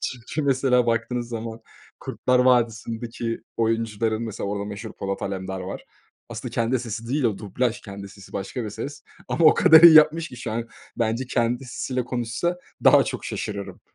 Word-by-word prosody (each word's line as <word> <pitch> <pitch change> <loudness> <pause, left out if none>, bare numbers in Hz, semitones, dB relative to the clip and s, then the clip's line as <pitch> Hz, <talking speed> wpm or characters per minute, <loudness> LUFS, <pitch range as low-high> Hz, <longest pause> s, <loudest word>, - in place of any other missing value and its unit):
Çünkü, 125 +5 -4
mesela, 130 -3 +2
baktığınız 120 +1 -1
zaman 115 -1 -6 0.4
Kurtlar 125 0 0
Vadisi'ndeki 115 -2 0 0.2
oyuncuların, 115 -1 0
mesela, 110 -3 -4
orada 100 0 -3
meşhur 105 +2 -7
Polat 100 0 -4
Alemdar 95 -1 -4
var. 95 +1 -7 0.4
Aslında - - -7
kendi 115 +2 +1
sesi 115 -1 -6
değil 140 +2 0
o, 110 -4 +1
dublaj. 115 +3 -2
Kendi 100 -1 -9
sesi 100 0 -15
başka 100 +5 -4
bir 105 - -5
ses 145 +6 -7 0.3
ama 170 - +1
o 155 - +8
kadar 160 0 +8
iyi 170 -2 +11
yapmış 155 +2 +6
ki 125 - -11
şu 120 -2 -5
an 115 +1 -3 0.3
bence 115 +2 -1
kendi 120 +1 0
sesiyle 125 0 -3
konuşsa 125 +9 -2 0.3
daha - - +7
çok - - -5
şaşırırım. 100 -2 -5
115 Hz, 170 wpm, -24 LUFS, 110-125 Hz, 0.4 s, iyi